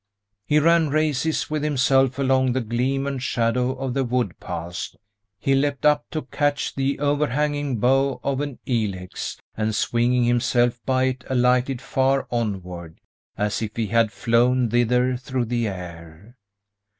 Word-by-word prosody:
He 150 - +3
ran 165 0 +4
races 155 0 0
with 155 -1 -1
himself 135 -2 +2
along 130 -2 +2
the 130 - 0
gleam 125 +4 -1
and 140 -2 -3
shadow 125 +1 0
of 130 -1 -3
the 135 0 +1
wood 120 -7 -1
paths. 85 +4 -6 0.4
He 135 - 0
leapt 140 0 0
up 150 -1 +3
to 155 - -3
catch 145 +2 -1
the 135 +1 -1
overhanging 145 -1 0
bough 135 +4 +2
of 140 0 -1
an 145 -3 -4
ilex, 100 -7 -3 0.2
and 110 0 -1
swinging 120 +2 +2
himself 120 0 +2
by 130 -1 +2
it 130 -1 -1
alighted 125 0 +2
far 135 +1 +1
onward, 90 -8 -4 0.4
as 105 0 -1
if 110 -1 -4
he 115 - -1
had 115 0 +2
flown 120 +4 +2
thither 125 +1 +2
through 130 -1 -2
the 120 0 -1
air. 90 +2 -9
125 Hz, 150 wpm, -23 LUFS, 115-135 Hz, 0.4 s, ran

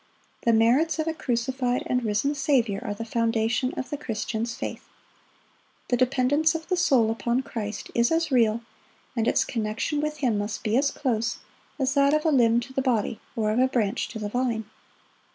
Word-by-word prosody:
The 235 - +5
merits 245 +9 +3
of 315 - -1
a 325 - 0
crucified 250 -2 -1
and 250 -1 0
risen 220 +6 +1
Saviour 250 -8 +1
are 205 -4 -3
the 230 - -5
foundation 230 +2 0
of 260 - -4
the 290 - -2
Christian's 230 -2 -3
faith. - - -6 1.0
The 245 - +3
dependence 275 +5 +2
of 325 0 -5
the 365 - +2
soul 255 -10 +3
upon 235 +3 -1
Christ 210 -4 -5
is 235 +3 +2
as 325 -2 +1
real, 230 -3 +3 0.5
and 230 -1 0
its - - +3
connection 225 +6 -2
with 305 0 -2
Him 245 -8 +1
must 205 +1 -4
be 215 +1 0
as 280 +2 +3
close, 235 -6 -1 0.4
as 270 -2 0
that 280 +1 +4
of 305 - -1
a - - +4
limb 235 -4 +4
to 265 +2 -9
the 270 - 0
body, 230 -4 0 0.2
or 215 -2 0
of 220 - +1
a 260 - +5
branch 235 -3 0
to - - -7
the 210 -1 -4
vine. 235 -2 -1
245 Hz, 190 wpm, -26 LUFS, 225-275 Hz, 1.0 s, The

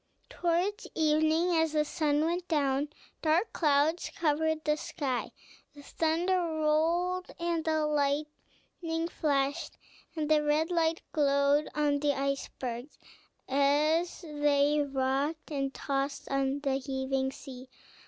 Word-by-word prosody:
Towards 355 +6 -1
evening, 315 +3 +2
as 320 -1 +1
the 300 -1 +2
sun 300 -1 +1
went 345 +2 -2
down, 285 -3 +1 0.3
dark 330 +7 +1
clouds 305 +2 +2
covered 315 0 0
the 300 0 +3
sky, 280 -5 -3 0.4
the 285 - -12
thunder 340 +5 0
rolled 335 +3 0
and 340 -1 -1
the 315 -1 +1
lightning 300 +3 -2
flashed, 285 0 -1 0.4
and 310 -2 -1
the 305 0 +4
red 300 +3 +1
light 330 -1 +1
glowed 280 0 +2
on 295 -1 +2
the 290 0 +2
icebergs 270 -2 -4 0.5
as 300 +6 +2
they 295 -2 +2
rocked 275 +3 -1
and 275 -2 -1
tossed 275 0 -3
on 275 +1 0
the 270 -2 0
heaving 265 0 -2
sea. 260 -1 -10
300 Hz, 120 wpm, -30 LUFS, 280-325 Hz, 0.5 s, the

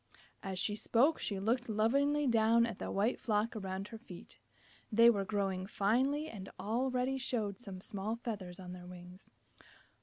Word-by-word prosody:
As 190 -2 -4
she 205 +3 0
spoke 255 +8 +3
she 200 -2 -2
looked 235 +5 0
lovingly 280 +7 +2
down 230 -1 +4
at 230 -4 -5
the - - -4
white 210 +5 +1
flock 215 +1 0
around 195 -1 -4
her 225 - -8
feet. 190 -7 -12 0.5
They 230 +2 +7
were 200 -3 0
growing 195 -2 -1
finely 260 +10 +1
and 200 -9 -8
already 255 +4 0
showed 225 -5 -2
some 195 -6 -8
small 205 +3 -3
feathers 200 -6 -6
on 180 -1 -7
their 180 -1 -10
wings. 180 +1 -12
215 Hz, 160 wpm, -34 LUFS, 195-240 Hz, 0.5 s, They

